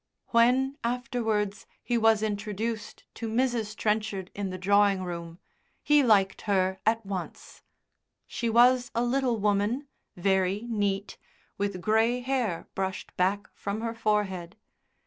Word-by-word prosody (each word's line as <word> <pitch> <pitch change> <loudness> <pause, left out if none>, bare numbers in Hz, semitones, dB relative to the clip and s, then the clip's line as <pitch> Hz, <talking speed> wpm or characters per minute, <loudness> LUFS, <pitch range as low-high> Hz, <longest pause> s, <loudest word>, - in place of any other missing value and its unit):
When, 260 +4 +3
afterwards, 230 -4 -1 0.2
he 240 - -1
was 225 -2 +4
introduced 215 +1 -3
to 225 -1 -5
Mrs. 230 -2 0
Trenchard 210 -3 -1
in 200 -1 -3
the 185 - -5
drawing 200 0 +3
room, 170 -2 -6 0.5
he 295 0 +5
liked 200 -6 +3
her 190 -1 +1
at 225 -1 +2
once. 190 -3 -6 0.6
She 235 - -3
was 245 +2 +5
a 235 - +2
little 245 -1 +1
woman, 210 +6 +1 0.3
very 190 +3 +1
neat, 205 -3 -2 0.4
with 200 -2 -2
grey 225 +4 +2
hair 245 -9 -1
brushed 190 -1 -4
back 195 +3 0
from 200 +2 -4
her 230 0 -2
forehead. 205 -5 -1
210 Hz, 125 wpm, -28 LUFS, 195-235 Hz, 0.6 s, he